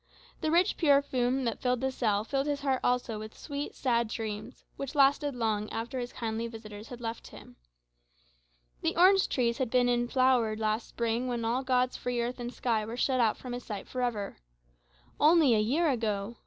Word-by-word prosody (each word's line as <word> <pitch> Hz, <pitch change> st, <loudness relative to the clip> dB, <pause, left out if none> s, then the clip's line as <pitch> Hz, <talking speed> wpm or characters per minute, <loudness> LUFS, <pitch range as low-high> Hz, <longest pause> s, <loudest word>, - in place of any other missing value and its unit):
The 315 Hz, -, -1 dB
rich 345 Hz, +3 st, +3 dB
perfume 270 Hz, -4 st, +2 dB
that 230 Hz, -3 st, -2 dB
filled 250 Hz, -1 st, +1 dB
the 265 Hz, 0 st, 0 dB
cell 215 Hz, -5 st, 0 dB
filled 275 Hz, +4 st, -1 dB
his 290 Hz, -1 st, -1 dB
heart 270 Hz, -2 st, +1 dB
also 245 Hz, -3 st, 0 dB
with 215 Hz, 0 st, -9 dB
sweet 285 Hz, -1 st, -5 dB
sad 235 Hz, -3 st, +1 dB
dreams, 220 Hz, +1 st, -6 dB
which 275 Hz, 0 st, -6 dB
lasted 280 Hz, 0 st, +3 dB
long 215 Hz, -3 st, -1 dB
after 235 Hz, +3 st, -4 dB
his 245 Hz, 0 st, -4 dB
kindly 225 Hz, 0 st, -3 dB
visitors 220 Hz, -2 st, -9 dB
had 245 Hz, -, -9 dB
left 230 Hz, 0 st, -5 dB
him. -, -, -13 dB, 1.3 s
The -, -, 0 dB
orange 380 Hz, +2 st, +5 dB
trees 235 Hz, -1 st, 0 dB
had 260 Hz, -, +1 dB
just -, -, -13 dB
been 245 Hz, -1 st, +4 dB
in 240 Hz, 0 st, +1 dB
flower 250 Hz, -4 st, +3 dB
last 215 Hz, +1 st, -1 dB
spring 235 Hz, +1 st, -1 dB
when 240 Hz, -2 st, -2 dB
all 240 Hz, +3 st, +1 dB
God's 255 Hz, -1 st, +1 dB
free 245 Hz, -1 st, -2 dB
earth 240 Hz, +2 st, -2 dB
and 240 Hz, 0 st, -4 dB
sky 230 Hz, -4 st, 0 dB
were 225 Hz, +3 st, -6 dB
shut 255 Hz, 0 st, +1 dB
out 225 Hz, -3 st, +3 dB
from 250 Hz, -2 st, -7 dB
his 245 Hz, 0 st, -5 dB
sight 210 Hz, -3 st, -6 dB
for 255 Hz, -, -4 dB
ever. 220 Hz, -5 st, -2 dB, 0.8 s
Only 305 Hz, -4 st, +6 dB
a 215 Hz, -, +3 dB
year 280 Hz, +11 st, +2 dB
ago! 220 Hz, -2 st, -2 dB
245 Hz, 195 wpm, -29 LUFS, 225-265 Hz, 1.3 s, Only